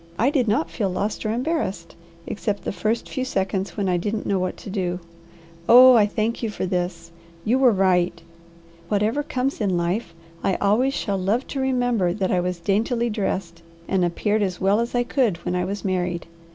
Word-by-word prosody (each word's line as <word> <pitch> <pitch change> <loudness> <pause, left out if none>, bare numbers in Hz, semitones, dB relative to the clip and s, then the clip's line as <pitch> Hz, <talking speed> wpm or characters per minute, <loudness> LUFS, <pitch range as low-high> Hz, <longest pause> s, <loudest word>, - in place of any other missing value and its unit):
I 255 +5 +3
did 260 -5 +1
not 170 -6 +1
feel 190 +4 -1
lost 205 +4 -2
or - - 0
embarrassed, 235 - -2 0.3
except 210 -1 -3
the - - -2
first 220 +3 -1
few 260 - -3
seconds 195 -4 -2
when 200 -2 0
I 180 -1 +2
didn't 210 +5 -2
know 195 -1 +1
what 185 0 -2
to - - -9
do. 180 -3 -2 0.7
Oh 255 +2 +10
I 215 -4 +5
thank 220 +2 -2
you 230 - -1
for 205 - -3
this! 175 -2 -3 0.3
You 245 +5 +2
were 260 -2 +6
right. 180 -3 +2 0.7
Whatever 215 +7 +1
comes 270 -3 -2
in 190 -4 +1
life 170 +1 -2 0.3
I 190 - +1
always 235 +7 +2
shall 200 -2 -1
love 210 +8 0
to 275 - -3
remember 245 -8 +1
that 190 -1 -1
I 180 - +2
was 180 0 -2
daintily 230 +6 0
dressed 190 -5 -3 0.3
and 190 -2 +1
appeared 205 +5 0
as 185 -3 -1
well 195 +3 +3
as 235 +1 -2
I 245 - +3
could 240 -7 +1
when 180 - -1
I 180 0 0
was 200 +2 -5
married. 180 -2 -1
200 Hz, 195 wpm, -23 LUFS, 180-235 Hz, 0.7 s, Oh